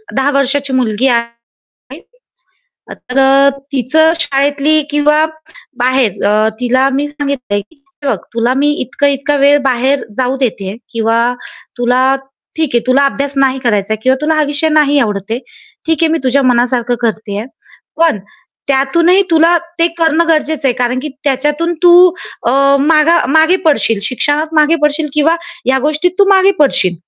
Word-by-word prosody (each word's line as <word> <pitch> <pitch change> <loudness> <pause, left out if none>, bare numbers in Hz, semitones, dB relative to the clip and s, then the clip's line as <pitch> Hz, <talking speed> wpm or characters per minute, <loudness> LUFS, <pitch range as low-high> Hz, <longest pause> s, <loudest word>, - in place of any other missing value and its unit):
10 270 +1 +1
वर्षाची 275 0 -1
मुलगी 250 0 0
आहे. 235 -1 -2 1.5
तर 250 +2 -6
अ, 275 +1 +4 0.2
तीच 255 -2 -3 0.3
शाळेतली 290 0 +1
किंवा 300 +1 +2 0.6
बाहेर 255 -5 0
अ, 215 +1 +2
तिला 255 +2 +1
मी 285 +2 -1
सांगितल 280 -8 -3
की 215 +10 -18 0.3
"हे 280 - -1
बघ - - +1 0.2
तुला 235 +2 0
मी 290 +2 +2
इतका-इतका 280 +2 -1
वेळ 285 +1 +4
बाहेर 265 +1 0
जाऊ 255 +1 -1
देते 205 -5 -3 0.2
किंवा 230 0 0 0.6
तुला 255 +2 +2 0.4
ठीक 320 -1 0
आहे, - - +5
तुला 265 +2 +3
अभ्यास 275 0 -3
नाही 270 -1 +1
करायचा 210 -3 0
आहे 220 - -2
किंवा 260 +2 +2
तुला 310 +1 0
हा 310 - +1
विषय 290 +2 -1
नाही 300 -2 +2
आवडत 205 -4 -3
आहे. 230 - -1 0.5
ठीक 320 -1 0
आहे 325 - +3
मी 325 - 0
तुझ्या 270 +2 +2
मनासारख 245 -1 +1
करतेय. 215 -2 -3 0.5
पण 325 -8 +1 0.5
त्या 275 - +2
त्यातूनही 340 +7 +2
तुला 330 +1 +4 0.2
ते 335 - +3
करणं 325 0 +2
गरजेच 310 -2 0
आहे, 265 - +3
कारण 250 +1 -1
की 305 - -4 0.2
त्याच्यातून 295 +5 -1
तू 350 -1 +6 0.5
अ, - - +3 0.3
माग 305 +1 +3 0.3
मागे 320 +3 +4
पडशील. 280 -8 +1
शिक्षणात 290 +7 -2
मागे 305 +2 +3
पडशील 300 +1 0
किंवा 305 +2 +2 0.3
या 265 +1 +2
गोष्टीत 305 +4 0
तू 400 - +6
मागे 390 0 +4
पडशील, 260 -11 +1
275 Hz, 155 wpm, -13 LUFS, 245-300 Hz, 1.5 s, तू